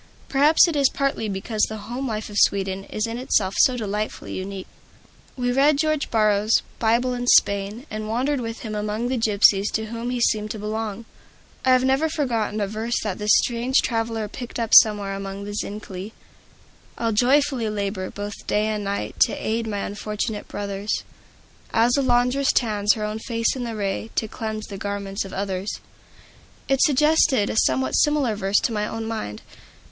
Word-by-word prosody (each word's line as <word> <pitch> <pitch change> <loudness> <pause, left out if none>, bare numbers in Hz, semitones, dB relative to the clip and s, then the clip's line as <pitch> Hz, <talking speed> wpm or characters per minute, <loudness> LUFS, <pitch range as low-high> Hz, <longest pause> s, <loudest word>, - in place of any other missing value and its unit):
Perhaps 295 +5 +5
it 335 - -2
is 280 -2 +4
partly 275 -6 -1
because 205 +3 -3
the 220 - -5
home 245 +6 -5
life 215 -2 -3
of 205 - -5
Sweden 195 -1 +1
is 215 - -2
in 230 +1 -4
itself 200 -6 +1
so 255 -1 +5
delightfully 210 -1 -4
unique. 190 0 -5 0.7
We 245 -1 0
read 280 +3 +4
George 310 -1 0
Borrow's 215 0 +2 0.2
"Bible 235 +3 +2
in 245 0 -4
Spain," 200 +3 +3
and 215 0 -4
wandered 255 +4 0
with 230 -1 -5
him 220 -3 -5
among 210 +3 -2
the 260 - 0
gypsies 205 -2 +4
to 220 0 -2
whom 230 +1 -4
he 250 0 -2
seemed 215 -2 +1
to 215 - -4
belong. 215 +1 -4 0.6
I 260 - +2
have 255 0 +4
never 270 +4 +2
forgotten 230 -8 -1
a 205 - +1
verse 220 +3 -2
that 210 -2 -3
this 210 0 -3
strange 245 +2 +1
traveler 225 -2 -1
picked 240 +3 -7
up 230 -1 -2
somewhere 205 -2 +6
among 195 0 -6
the 205 0 -6
Zincali: 205 -1 -6 0.8
"I'll 230 -1 0
joyfully 255 +1 +2
labor, 200 -2 -3
both 205 0 -6 0.2
night - - +1
and 210 0 0
day, 200 0 -3
To - - +4
aid 225 +1 -1
my 205 -2 -3
unfortunate 210 +1 -4
brothers; 200 +1 -3 0.7
As 235 +2 +3
a 280 - +2
laundress 250 +2 +2
tans 210 -3 +2
her 215 - -5
own 210 +1 -3
face 230 0 -1
in 250 -2 -4
the 230 -1 -4
ray 205 +1 -3
To 220 - 0
cleanse 215 0 -5
the 195 -2 -8
garments 200 0 -3
of 190 - -9
others." 195 0 -3 0.9
It 270 -1 +2
suggested 285 -6 +3
a - - -4
somewhat 130 -9 +2
similar 290 -7 +2
verse 195 0 +1
to 230 - -1
my 210 -1 -1
own 225 0 -5
mind. 215 - -5
220 Hz, 180 wpm, -23 LUFS, 205-245 Hz, 0.9 s, somewhere